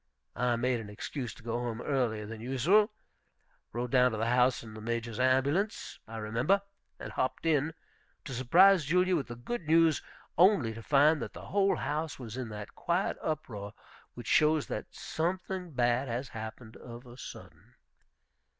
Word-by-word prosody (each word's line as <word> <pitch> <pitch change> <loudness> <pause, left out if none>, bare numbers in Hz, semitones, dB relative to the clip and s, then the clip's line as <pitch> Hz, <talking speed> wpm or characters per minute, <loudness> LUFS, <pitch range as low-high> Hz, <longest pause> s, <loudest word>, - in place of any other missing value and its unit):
I 125 0 +1
made 120 +1 0
an 105 -2 -8
excuse 120 +4 -5
to - - -16
go 120 +1 -2
home 120 -2 -3
earlier 120 -6 -1
than 110 +1 -8
usual; 155 - +3 0.8
rode 120 +1 -3
down 125 -2 +4
to - - -2
the 110 - 0
house 125 +1 +3
in 110 -2 -10
the 110 - -9
Major's 115 0 -3
ambulance, 135 +11 +1
I 115 +1 -7
remember; 115 - +1 0.4
and - - -7
hopped 130 +5 -2
in, 160 0 +2 0.5
to 135 - -6
surprise 170 +9 +5
Julia 180 +4 +3
with 150 - -1
the 120 - -7
good 155 - -5
news, 165 -1 +4 0.4
only 175 - +5
to 115 - -8
find 145 +5 +4
that - - -5
the - - -10
whole 200 0 +2
house 155 +1 -3
was 115 -4 -7
in 130 -3 -4
that 105 -1 -8
quiet 175 +3 0
uproar 105 -10 -4 0.4
which - - -8
shows 155 -1 +3
that - - -4
something 180 +2 -3
bad 125 +1 +2
has 125 +2 -3
happened 110 0 -8
of 120 +1 -10
a 120 -1 -12
sudden. 125 - -11
125 Hz, 170 wpm, -30 LUFS, 115-160 Hz, 0.8 s, surprise